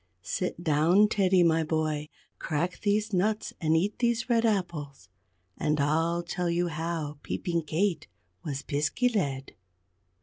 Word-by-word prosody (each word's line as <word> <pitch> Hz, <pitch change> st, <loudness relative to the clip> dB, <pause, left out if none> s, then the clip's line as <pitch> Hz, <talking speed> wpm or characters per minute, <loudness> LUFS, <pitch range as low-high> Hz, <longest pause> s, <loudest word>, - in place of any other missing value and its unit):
Sit 175 Hz, -, -3 dB
down, 170 Hz, +6 st, +4 dB
Teddy, 190 Hz, -3 st, +3 dB
my 165 Hz, -1 st, +3 dB
boy, 155 Hz, -1 st, -1 dB, 0.3 s
crack 165 Hz, +3 st, -2 dB
these 210 Hz, +1 st, 0 dB
nuts, 210 Hz, +4 st, 0 dB
and 160 Hz, 0 st, +3 dB
eat 200 Hz, +5 st, -1 dB
these 240 Hz, 0 st, 0 dB
red 230 Hz, -1 st, +3 dB
apples; 150 Hz, -, -3 dB, 0.5 s
and 150 Hz, -1 st, +1 dB
I'll 165 Hz, +4 st, +1 dB
tell 175 Hz, 0 st, -2 dB
you 175 Hz, +1 st, 0 dB
how 160 Hz, -2 st, -4 dB
Peeping 170 Hz, -3 st, -2 dB
Kate 165 Hz, +1 st, 0 dB, 0.4 s
was 140 Hz, -1 st, -4 dB
Piskey 150 Hz, -, 0 dB
led. 140 Hz, -10 st, -1 dB
170 Hz, 135 wpm, -28 LUFS, 150-195 Hz, 0.5 s, down